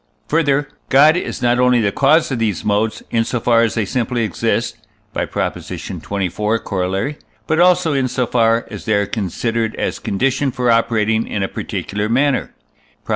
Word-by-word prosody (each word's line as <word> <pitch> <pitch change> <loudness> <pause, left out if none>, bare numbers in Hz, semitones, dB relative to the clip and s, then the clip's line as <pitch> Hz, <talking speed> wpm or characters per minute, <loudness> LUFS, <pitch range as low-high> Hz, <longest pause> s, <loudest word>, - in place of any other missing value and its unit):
Further, 145 -3 +2 0.2
God 150 +4 +6
is 180 - -4
not 120 0 +3
only 125 -1 +4
the 100 -3 +1
cause 145 +7 +3
of 125 - -1
these 110 -4 -1
modes, 105 +1 0
in 115 -1 +2
so 120 +1 -2
far 115 0 +3
as 115 -2 +1
they 110 -3 0
simply 120 +2 -1
exist 105 -7 -1 0.4
(by - - -2
Prop. - - -2
xxiv, - - -7 0.6
Coroll.), 95 +9 -2 0.3
but 160 +1 0
also 180 -2 +4
in 135 -2 +1
so 125 0 -1
far 115 -1 +2
as - - -8
they 110 - +2
are 100 0 +2
considered 110 +3 -2
as - - -2
conditioned 135 +5 0
for 125 -1 +2
operating 110 -1 +1
in 100 - -2
a - - 0
particular 105 +2 -4
manner 135 +3 +1 0.5
(Prop. - - -22
115 Hz, 180 wpm, -18 LUFS, 110-135 Hz, 0.6 s, God